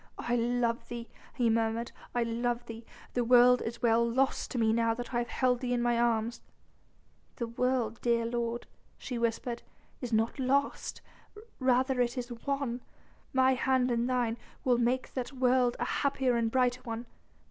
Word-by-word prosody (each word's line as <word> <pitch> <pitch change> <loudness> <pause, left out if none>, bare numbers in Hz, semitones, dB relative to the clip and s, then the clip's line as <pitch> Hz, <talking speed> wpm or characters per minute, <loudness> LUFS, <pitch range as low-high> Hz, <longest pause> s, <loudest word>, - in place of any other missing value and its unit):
"I 240 - -1
love 235 0 0
thee," 235 -1 -6 0.3
he 245 -3 +2
murmured, 225 +1 0 0.2
"I 240 - +2
love 235 +1 -1
thee. 230 0 -9 0.3
The 245 - +1
world 245 +1 +6
is 235 +2 -5
well 230 0 +4
lost 260 +3 +1
to - - -4
me 220 -1 +3
now 230 0 +2
that 245 +2 -6
I 240 - +2
have 240 - -2
held 250 -1 +1
thee 250 -1 -1
in 240 - +1
mine 240 -1 +2
arms." 235 0 +1 0.9
"The 235 - -2
world, 235 -1 -1
dear 235 -1 +2
lord," 235 0 -2 0.3
she 245 -3 -5
whispered, 235 +1 -1 0.4
"is 245 -2 -4
not 225 +4 +1
lost, 275 +2 0 0.6
rather 255 0 +2
is 240 +1 0
it 240 0 -6
won. 275 -3 -1 0.5
My 260 -1 +4
hand 255 -1 +2
in 235 0 +1
thine, 245 -2 0 0.3
we'll 245 -2 +3
make 245 +2 0
that 255 +1 -4
world 250 -1 +3
a - - 0
happier 265 -3 +1
and 230 -1 +1
brighter 250 0 +1
one. 230 -1 -5
240 Hz, 170 wpm, -30 LUFS, 235-255 Hz, 0.9 s, world